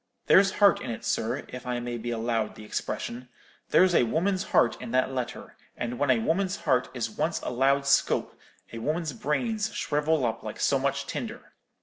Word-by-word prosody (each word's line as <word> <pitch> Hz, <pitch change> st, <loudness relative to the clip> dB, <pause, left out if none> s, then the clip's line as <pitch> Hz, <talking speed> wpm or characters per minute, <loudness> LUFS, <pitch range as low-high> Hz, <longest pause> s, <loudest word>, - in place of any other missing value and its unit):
There's 195 Hz, 0 st, +5 dB
heart 200 Hz, -1 st, +4 dB
in -, -, -5 dB
it, 115 Hz, -, -5 dB
sir, 110 Hz, -, -1 dB
if 125 Hz, 0 st, -8 dB
I 125 Hz, -1 st, -1 dB
may 120 Hz, 0 st, -4 dB
be 120 Hz, +2 st, -4 dB
allowed 115 Hz, -1 st, -1 dB
the 110 Hz, -, -11 dB
expression: 120 Hz, +3 st, -4 dB, 0.4 s
there's 185 Hz, -1 st, +5 dB
a -, -, +5 dB
woman's 185 Hz, -, 0 dB
heart 115 Hz, -, +3 dB
in 125 Hz, -, -6 dB
that 130 Hz, +1 st, +2 dB
letter: 125 Hz, -2 st, -5 dB, 0.2 s
and 120 Hz, 0 st, -4 dB
when 145 Hz, -1 st, +1 dB
a 130 Hz, -, +5 dB
woman's 185 Hz, -, 0 dB
heart 130 Hz, -6 st, +1 dB
is 115 Hz, -2 st, -2 dB
once 155 Hz, +7 st, -1 dB
allowed 135 Hz, +3 st, +1 dB
scope, 140 Hz, 0 st, +2 dB, 0.4 s
a 115 Hz, -, -5 dB
woman's 155 Hz, +4 st, -2 dB
brains 215 Hz, -, -1 dB
shrivel 150 Hz, -1 st, +1 dB
up 115 Hz, 0 st, -2 dB
like -, -, -7 dB
so -, -, +2 dB
much -, -, -1 dB
tinder. -, -, -6 dB
130 Hz, 190 wpm, -27 LUFS, 120-160 Hz, 0.4 s, There's